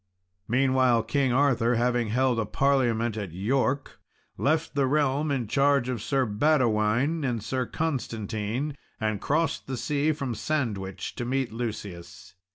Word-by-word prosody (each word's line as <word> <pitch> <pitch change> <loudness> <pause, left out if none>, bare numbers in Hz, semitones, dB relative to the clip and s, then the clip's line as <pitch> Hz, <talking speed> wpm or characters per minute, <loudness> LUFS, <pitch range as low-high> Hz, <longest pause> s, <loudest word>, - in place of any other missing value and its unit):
Meanwhile, 130 -2 +3
King 140 -3 +1
Arthur 125 -3 +3
having 120 0 +1
held 125 +2 +1
a 110 - 0
parliament 120 -5 +1
at 100 -6 -5
York, 130 +8 -1 0.4
left 155 +3 0
the 140 -2 +2
realm 145 +1 +1
in 130 -5 -1
charge 140 0 +2
of 120 -4 -2
Sir 135 +2 +1
Badewine 120 +4 +2
and 120 -6 -1
Sir 130 +2 -2
Constantine, 120 -3 -3 0.2
and 110 -2 -1
crossed 160 +2 0
the 130 -1 -3
sea 145 +4 +1
from 140 -5 -3
Sandwich 110 -7 -3
to 120 - -2
meet 130 -1 -1
Lucius. 105 -7 -6
130 Hz, 140 wpm, -27 LUFS, 115-140 Hz, 0.4 s, Meanwhile